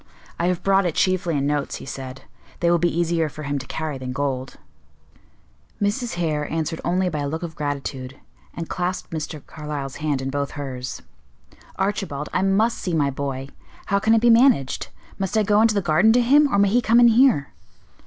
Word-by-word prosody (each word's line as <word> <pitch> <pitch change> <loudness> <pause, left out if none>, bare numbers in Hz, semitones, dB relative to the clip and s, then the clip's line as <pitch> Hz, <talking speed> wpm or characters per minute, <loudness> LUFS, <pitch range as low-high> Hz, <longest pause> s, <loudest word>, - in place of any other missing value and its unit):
"I 170 - +1
have 180 -1 -1
brought 195 -1 +3
it 165 - -3
chiefly 180 -4 +1
in 140 - 0
notes," 145 0 -1
he - - -8
said: 130 -1 -7 0.4
"they 170 0 +2
will 175 - +3
be 175 - +2
easier 165 -1 0
for 150 +1 -9
him 140 0 -2
to 130 - -9
carry 155 -4 -4
than 130 0 -5
gold." 135 -1 -3 1.2
Mrs. 215 +3 -1
Hare 155 -4 -1
answered 160 0 -2
only 180 +2 +1
by 155 -4 -2
a 145 - -2
look 160 +4 -4
of 165 -2 -5
gratitude, 140 -3 -4 0.4
and 165 -1 -5
clasped 180 +1 -3
Mr. 155 -2 -5
Carlyle's 150 -3 -6
hand 150 -3 -1
in 135 0 -3
both 140 0 -2
hers. 130 -3 -5 0.7
"Archibald, 195 -7 -2
I - - +1
must 200 +5 +2
see 180 -4 -2
my 145 -3 +2
boy; 135 -1 -4 0.4
how 200 - +1
can 220 +3 +3
it 225 - +3
be 240 0 +5
managed? 230 - +3 0.3
Must 195 +2 -1
I 215 - +4
go 210 +1 +3
into 225 -1 +3
the 200 - +2
garden 175 +7 +4
to 245 - +4
him, 285 +4 +5
or - - +2
may 200 0 +4
he 240 +5 +3
come 230 +1 +4
in 240 -1 +7
here?" 230 - +4
165 Hz, 205 wpm, -23 LUFS, 140-200 Hz, 1.2 s, in